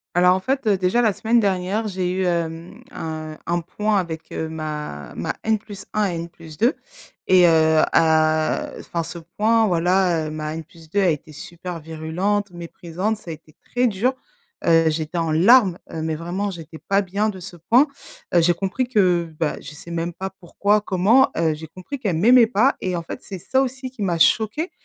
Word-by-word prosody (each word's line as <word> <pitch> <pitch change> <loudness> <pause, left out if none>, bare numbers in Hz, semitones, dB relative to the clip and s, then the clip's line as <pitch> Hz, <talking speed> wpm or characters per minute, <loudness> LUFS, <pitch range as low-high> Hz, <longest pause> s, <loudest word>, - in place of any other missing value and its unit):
Alors 180 +1 +5
en 190 - -2
fait, 265 +1 -1
heu, 200 -2 +4
déjà 185 +6 +2
la 220 -3 +3
semaine 230 +4 +2
dernière 200 +1 0
j'ai 185 -2 -2
eu 190 +1 -1
hem, 170 -1 -3
un 155 -1 -6
un 175 0 0
point 210 +5 -1
avec, 165 -4 -4
heu, 160 - -3
ma 150 - -6
ma - - -3
N+1 215 -1 -2
et - - -4
N+2 165 - -2 0.5
et 185 -1 +6
heu, 160 -1 +4
à, 155 -1 +2
heu - - -10
enfin 170 -1 -3
ce 170 +1 -8 0.2
point, 225 +1 +3
voilà, 175 -2 +2
heu, - - -4
ma 155 0 -4
N+2 165 +3 -5
a 190 - +3
été 155 0 -3
super 170 +3 -8
virulente, 165 +6 -2
méprisante, 175 +4 -4
ça 190 -6 -10
a - - -3
été 155 0 -16 0.2
très 245 0 +2
dur, 225 +5 0 0.5
heu, 165 -1 +5
j'étais 155 +2 -3
en 165 -2 0
larmes, 190 +2 +5 0.2
heu, 160 - -4
mais 160 0 -2
vraiment 180 +5 -3
j'étais 165 -3 -10
pas 195 0 +4
bien 200 +3 -1
de 190 -3 -7
ce 180 0 -9
point, 235 - +3 0.5
heu, 175 - +6
j'ai 175 +1 +4
compris 200 +8 -2
que, 180 -7 +2
bah, 160 -3 0
je - - -9
sais 170 +3 -11
même 170 +1 -2
pas 190 +3 -5
pourquoi, 200 +4 +1
comment, 210 +8 +4
heu, 165 -1 +2
j'ai 160 +1 -9
compris 185 - -8
qu'elle 200 -10 -1
m'aimait 235 +6 +6
pas 245 +4 +3
et 185 -1 -1
en - - -3
fait, 165 - -7
c'est 190 -2 -7
ça 260 +9 +1
aussi 260 0 -4
qui 255 -4 -11
m'a 175 -4 0
choquée, 225 - +2
180 Hz, 195 wpm, -22 LUFS, 165-210 Hz, 0.5 s, et